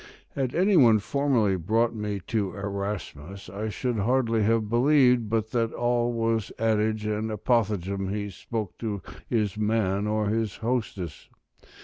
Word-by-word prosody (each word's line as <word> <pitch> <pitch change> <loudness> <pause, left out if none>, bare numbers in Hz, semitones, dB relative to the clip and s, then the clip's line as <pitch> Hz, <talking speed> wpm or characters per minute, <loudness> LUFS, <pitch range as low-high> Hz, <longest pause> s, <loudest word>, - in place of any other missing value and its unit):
Had 130 -2 -3
any 190 +3 +3
one 120 -9 +7
formerly 115 -4 +1
brought 110 +7 +1
me 105 -3 -3
to 100 -5 -1
Erasmus, 100 -3 -5
I 105 +3 -3
should 120 +1 -2
hardly 115 +1 +2
have 110 0 +2
believed 125 -1 +4
but 110 0 -1
that 115 -2 0
all 120 0 +1
was 115 -2 -1
adage 110 -1 +1
and 105 +1 -1
apothegm 100 -4 0
he 100 0 -3
spoke 105 +2 -5
to 105 -5 -3 0.2
his 105 -3 -1
man 105 -2 +1
or 105 0 0
his 110 -1 -1
hostess. 110 -9 -3
110 Hz, 140 wpm, -26 LUFS, 100-115 Hz, 0.2 s, one